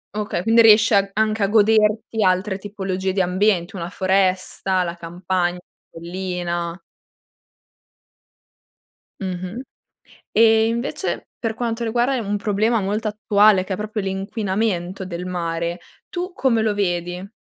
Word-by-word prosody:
Okay. 210 -4 -2
Quindi, 225 +3 +5
riesc 225 0 +6
a 200 -2 +3
anche 215 +1 0
a 200 - +3
goderti 215 +1 +2
altre 190 +1 +1
tipologie 190 -2 -3
di 190 - +1
ambienti, 185 0 +1
una 170 -2 -5
foresta, 190 -1 +1
la 170 -1 -3
campagn 175 +1 -2 0.3
collina. 175 0 -4 2.4
Mh-mh. 185 +4 -5 0.7
E, 225 0 +5
invece, 235 +3 -3
per 225 -2 -2
quanto 235 0 -2
riguarda, 240 +4 +1
è - - 0
un 205 -3 -2
problema 215 +2 +1
molto 210 +3 -1
attuale, 210 -2 +3
che 190 - -5
è - - -5
proprio 215 +1 -4
l'inquinamento 195 -1 -2
del 180 -1 -6
mare, 170 -1 -3 0.3
tu 355 +1 -4
come 255 - +1
lo 215 -1 +1
vedi? 180 0 -2
195 Hz, 125 wpm, -21 LUFS, 180-220 Hz, 2.4 s, riesc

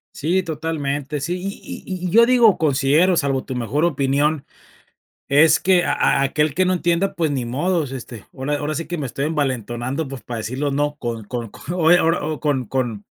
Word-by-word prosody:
Sí, 175 +6 0
totalmente. 150 -3 -3
Sí, 175 +6 -2
y 195 +2 -7
y 185 -2 -5
y - - 0
y - - -4
yo 230 +5 +6
digo 240 -5 +5
considero, 155 +4 +3
salvo 135 -4 0
tu 130 - -5
mejor 125 +6 -1
opinión, 145 -1 +1 0.8
es 155 +3 +5
que 180 -1 +3
a - - +1
a - - +2
aquel 150 +2 +1
que 185 +5 +2
no 185 - +2
entienda, 175 +2 0
pues 160 -3 0
ni 130 -4 -2
modos. 150 +4 -1
Este, 120 -4 -8
ahora 145 +2 -2
ahora 150 +1 -3
sí 165 +3 -3
que 175 - -4
me 150 - -3
estoy 135 +3 -3
envalentonando, 130 -1 -2
pues, 135 -1 -8
para 120 -2 -5
decirlo 130 +6 -2
no 145 +1 0
con 115 -4 -4
con 115 +1 -5
con 170 - 0
eh - - +7
ahora 165 -3 +1
o 155 -1 -3
con 140 -4 0
con 120 -4 -2
con - - -53
145 Hz, 210 wpm, -21 LUFS, 135-170 Hz, 0.8 s, eh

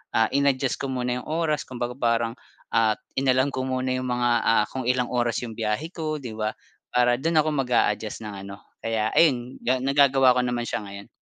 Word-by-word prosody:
ah, 110 -1 +3
in-adjust 140 -1 +1
ko 140 - -3
muna 125 -1 -2
yung - - -11
oras 155 -2 0
kumbaga 125 -1 -4
parang, 115 -1 +1 0.4
ah, 110 -1 +3 0.2
inalam 130 +1 +2
ko 130 0 -3
muna 130 0 -1
yung 130 0 -2
mga, 125 0 +1 0.2
ah, 110 -2 +4
kung 130 -2 -4
ilang 125 -1 +1
oras 120 -1 0
yung 115 - -5
biyahe 115 +10 -2
ko 155 -3 -3
'di 125 -5 -7
ba 110 0 -1 0.4
para 120 0 +3
dun 165 0 +1
ako 155 0 +3
mag-a-adjust 115 -5 0
ng 105 -2 -6
ano, 100 0 -8 0.2
kaya 110 -1 -1
ayun 130 -6 +2
ga 130 +1 +1
nagagawa 135 -2 +5
ko 125 - +2
naman 120 -1 -1
siya - - -3
ngayon. 100 0 -9
125 Hz, 200 wpm, -25 LUFS, 115-135 Hz, 0.4 s, nagagawa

